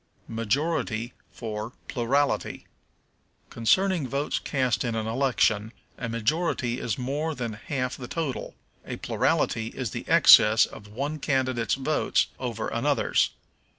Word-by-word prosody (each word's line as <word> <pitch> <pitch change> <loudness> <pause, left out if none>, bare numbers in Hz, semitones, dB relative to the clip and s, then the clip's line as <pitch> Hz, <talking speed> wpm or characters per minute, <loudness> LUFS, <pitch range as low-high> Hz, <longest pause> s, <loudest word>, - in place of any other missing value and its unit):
Majority 115 0 -1 0.2
for 110 0 -5
Plurality. 135 +4 0 0.9
Concerning 175 - +2
votes 140 +3 -1
cast 130 -3 0
in 120 -3 -2
an 110 -1 -2
election, 115 -3 +1 0.2
a 115 - -5
majority 120 +1 0
is 115 - -2
more 145 +5 -2
than 120 -3 -4
half 125 +3 -3
the 125 - -7
total; 155 -4 -4 0.3
a - - -5
plurality 115 -1 0
is 125 -2 -4
the - - -6
excess 105 +1 +8
of 105 - -12
one 140 +8 -4
candidate's 130 -5 0
votes 135 +3 +1
over 115 -4 -3
another's. 140 +4 +1
125 Hz, 120 wpm, -26 LUFS, 115-140 Hz, 0.9 s, excess